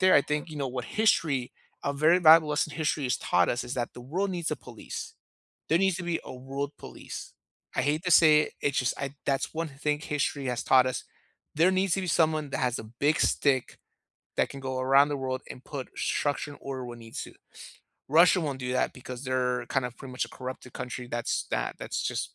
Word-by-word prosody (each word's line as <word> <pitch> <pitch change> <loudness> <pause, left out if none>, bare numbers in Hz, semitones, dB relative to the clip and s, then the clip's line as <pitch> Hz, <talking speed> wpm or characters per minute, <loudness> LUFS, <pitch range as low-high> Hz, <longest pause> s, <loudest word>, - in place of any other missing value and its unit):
there, 185 0 +6
I - - +8
think, 150 +3 -2
you 155 - -7
know, 140 -2 -2
what 125 -1 -4
history 155 - +2 0.3
a 140 - +1
very 155 +5 +4
valuable 160 -1 +8
lesson 150 +1 0
history 155 -2 0
has 125 - +1
taught 90 -1 +2
us 120 +1 -1
is 125 - -4
that 120 -1 -3
the - - -9
world 180 +11 -2
needs 175 -3 -2
a - - -2
police. 120 -4 -8 0.5
There 165 - +4
needs 190 -1 +2
to 190 - -5
be 170 -1 -1
a - - -8
world 135 +3 -4
police. - - -8 0.4
I - - +2
hate 150 +5 0
to 180 - 0
say 155 -2 +7
it, - - -5
it's 140 -1 +1
just 125 - +1
I 140 0 -4
that's 135 -1 0
one 165 0 -2
thing 150 +1 -1
history 145 -2 -2
has 125 -2 -1
taught 130 -1 +6
us. 130 -3 -2 0.5
There 165 +5 +5
needs 190 -1 +2
to 195 - -1
be - - -3
someone 155 -3 +2
that - - -2
has 125 -2 0
a - - -9
big 140 +8 0
stick 130 -3 +1 0.6
that - - +2
can 135 - -8
go 130 -1 -3
around 135 +2 +5
the 145 - -1
world 130 -1 -3
and 125 - -9
put 140 -3 -6
structure 145 0 -1
and - - -13
order 135 -2 -5
when 120 -1 -8
it - - -11
needs 115 - -6
to. - - -12 0.8
Russia 170 +5 +6
won't 145 -5 -2
do 125 0 -2
that 130 - +1
because 125 0 -8
they're 125 -1 0
kind 135 -2 0
of 125 - -9
pretty 135 -1 -9
much 125 - -1
a - - -16
corrupted 130 -1 -7
country, 125 -1 -5
that's 120 0 -1
that - - -1
that's - - -3
just - - -3
140 Hz, 230 wpm, -28 LUFS, 125-155 Hz, 0.8 s, I